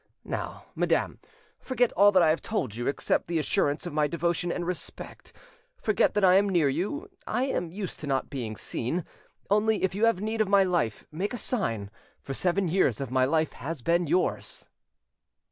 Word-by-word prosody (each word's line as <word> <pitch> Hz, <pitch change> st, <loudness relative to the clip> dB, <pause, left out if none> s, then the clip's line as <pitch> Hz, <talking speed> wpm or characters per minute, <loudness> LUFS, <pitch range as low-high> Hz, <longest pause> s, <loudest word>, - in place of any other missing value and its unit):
Now, -, -, -5 dB
madam, -, -, 0 dB, 0.4 s
forget 245 Hz, -2 st, +1 dB
all 205 Hz, -1 st, +5 dB
I 170 Hz, -3 st, +6 dB
have 155 Hz, -, +1 dB
told 175 Hz, -, -2 dB
you, 120 Hz, +2 st, -4 dB
except 140 Hz, -, 0 dB
the 170 Hz, 0 st, -1 dB
assurance 145 Hz, 0 st, 0 dB
of 175 Hz, -, -5 dB
my 150 Hz, -1 st, +2 dB
devotion 170 Hz, +2 st, -1 dB
and 175 Hz, -, -3 dB
respect: 180 Hz, 0 st, -6 dB, 0.5 s
forget 215 Hz, -, +2 dB
that 210 Hz, -, +2 dB
I 185 Hz, 0 st, +7 dB
am 200 Hz, +1 st, +3 dB
near 170 Hz, -6 st, +3 dB
you; 200 Hz, -, -2 dB, 0.2 s
I 245 Hz, +4 st, 0 dB
am 180 Hz, -10 st, -1 dB
used 190 Hz, 0 st, -5 dB
to 150 Hz, -, -6 dB
not 135 Hz, -2 st, 0 dB
being 120 Hz, -6 st, -5 dB
seen: 160 Hz, +9 st, -3 dB, 0.5 s
only, 210 Hz, +1 st, +2 dB
if 190 Hz, -, +1 dB
you 210 Hz, +4 st, +2 dB
have 230 Hz, -5 st, +2 dB
need 220 Hz, +2 st, -1 dB
of 210 Hz, -, +1 dB
my 200 Hz, -1 st, +6 dB
life, 175 Hz, -, -1 dB
make 195 Hz, +9 st, -3 dB
a -, -, -4 dB
sign; 115 Hz, -, -2 dB, 0.3 s
for 135 Hz, -, -6 dB
seven 185 Hz, +5 st, +1 dB
years 160 Hz, -, +2 dB
my 130 Hz, 0 st, +3 dB
life 155 Hz, +3 st, +1 dB
has 145 Hz, 0 st, -6 dB
been 170 Hz, +2 st, +2 dB
yours." 180 Hz, +4 st, -1 dB
175 Hz, 185 wpm, -27 LUFS, 150-205 Hz, 0.5 s, I